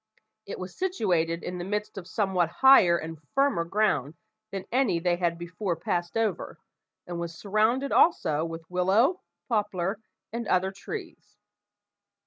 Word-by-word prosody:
It -, -, -5 dB
was 185 Hz, -1 st, -7 dB
situated 180 Hz, -, 0 dB
in 180 Hz, 0 st, -5 dB
the -, -, -3 dB
midst 210 Hz, +3 st, -3 dB
of 190 Hz, -3 st, -8 dB
somewhat 185 Hz, -5 st, 0 dB
higher 195 Hz, -11 st, +8 dB
and 160 Hz, -1 st, -7 dB
firmer 275 Hz, -11 st, +3 dB
ground 165 Hz, -6 st, 0 dB, 0.4 s
than 195 Hz, -1 st, -5 dB
any 240 Hz, -8 st, +2 dB
they 175 Hz, 0 st, +1 dB
had 170 Hz, -1 st, 0 dB
before 175 Hz, +2 st, -3 dB
passed 175 Hz, +3 st, -2 dB
over, 220 Hz, -5 st, -1 dB, 0.5 s
and 175 Hz, -1 st, -5 dB
was 170 Hz, -1 st, -5 dB
surrounded 220 Hz, -, +1 dB
also 155 Hz, -, +3 dB
with 165 Hz, 0 st, -6 dB
willow, 195 Hz, -, +2 dB, 0.3 s
poplar, 205 Hz, -4 st, -1 dB, 0.3 s
and 235 Hz, -1 st, -3 dB
other 185 Hz, +1 st, +2 dB
trees. 350 Hz, -, -9 dB
185 Hz, 140 wpm, -27 LUFS, 170-215 Hz, 0.5 s, higher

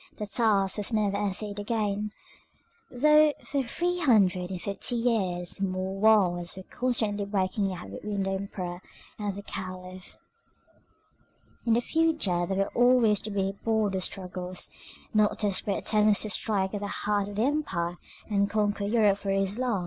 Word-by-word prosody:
The 210 Hz, -, -3 dB
task 200 Hz, -2 st, +2 dB
was 210 Hz, +2 st, -1 dB
never 210 Hz, -3 st, +1 dB
essayed 205 Hz, 0 st, -1 dB
again, 210 Hz, -1 st, -1 dB, 0.8 s
though 300 Hz, +3 st, +5 dB
for 280 Hz, -, -1 dB
three 350 Hz, +8 st, -2 dB
hundred 195 Hz, -, +3 dB
and 185 Hz, -2 st, -4 dB
fifty 200 Hz, +6 st, 0 dB
years 195 Hz, -7 st, -1 dB
more 190 Hz, 0 st, -2 dB
wars 185 Hz, -5 st, +3 dB
were 190 Hz, -, -7 dB
constantly 220 Hz, -3 st, 0 dB
breaking 195 Hz, 0 st, 0 dB
out 170 Hz, -, -8 dB
between 200 Hz, -, -3 dB
the 195 Hz, -, -1 dB
Emperor 185 Hz, -2 st, -4 dB, 0.4 s
and 205 Hz, -2 st, -2 dB
the 200 Hz, -, -7 dB
Caliph. 185 Hz, -1 st, -8 dB, 1.5 s
In 230 Hz, -, +4 dB
the 235 Hz, -, +3 dB
future 275 Hz, -, +1 dB
they 190 Hz, -, -1 dB
were 195 Hz, +1 st, -1 dB
always 245 Hz, -4 st, +4 dB
to 215 Hz, -, -5 dB
be 195 Hz, -1 st, -1 dB
border 215 Hz, -4 st, +1 dB
struggles, 185 Hz, -1 st, -2 dB, 0.4 s
not 215 Hz, -1 st, +3 dB
desperate 200 Hz, -1 st, 0 dB
attempts 210 Hz, -1 st, +3 dB
to 215 Hz, -, -2 dB
strike 195 Hz, -2 st, 0 dB
at 205 Hz, -, -3 dB
the 205 Hz, -, -3 dB
heart 205 Hz, 0 st, -1 dB
of 205 Hz, -, -8 dB
the 215 Hz, -, +1 dB
empire, 210 Hz, -, -1 dB, 0.3 s
and 200 Hz, -1 st, +1 dB
conquer 205 Hz, -1 st, 0 dB
Europe 205 Hz, -2 st, +3 dB
for 200 Hz, -, -5 dB
Islam. 200 Hz, +4 st, 0 dB
205 Hz, 155 wpm, -28 LUFS, 190-220 Hz, 1.5 s, though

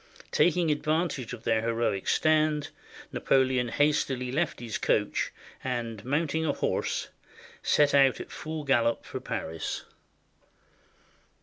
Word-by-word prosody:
Taking 175 Hz, -1 st, +3 dB
advan 155 Hz, +3 st, +1 dB
tage 130 Hz, -6 st, -6 dB
of 120 Hz, -2 st, -7 dB
their 110 Hz, -1 st, +2 dB
heroic 115 Hz, -4 st, -1 dB
stand, 155 Hz, -1 st, +2 dB, 0.4 s
Napoleon 130 Hz, -2 st, +2 dB
hastily 130 Hz, -2 st, +1 dB
left 155 Hz, +3 st, -1 dB
his 120 Hz, -2 st, -4 dB
coach, -, -, +1 dB, 0.3 s
and, 115 Hz, -5 st, -3 dB
mounting 155 Hz, +4 st, 0 dB
a 150 Hz, -3 st, +1 dB
horse, -, -, -1 dB, 0.5 s
set 145 Hz, -1 st, +3 dB
out 135 Hz, -2 st, +5 dB
at -, -, -8 dB
full 155 Hz, -1 st, -5 dB
gallop 120 Hz, -4 st, +2 dB
for -, -, -5 dB
Paris. 80 Hz, 0 st, -4 dB
135 Hz, 120 wpm, -28 LUFS, 120-155 Hz, 0.5 s, out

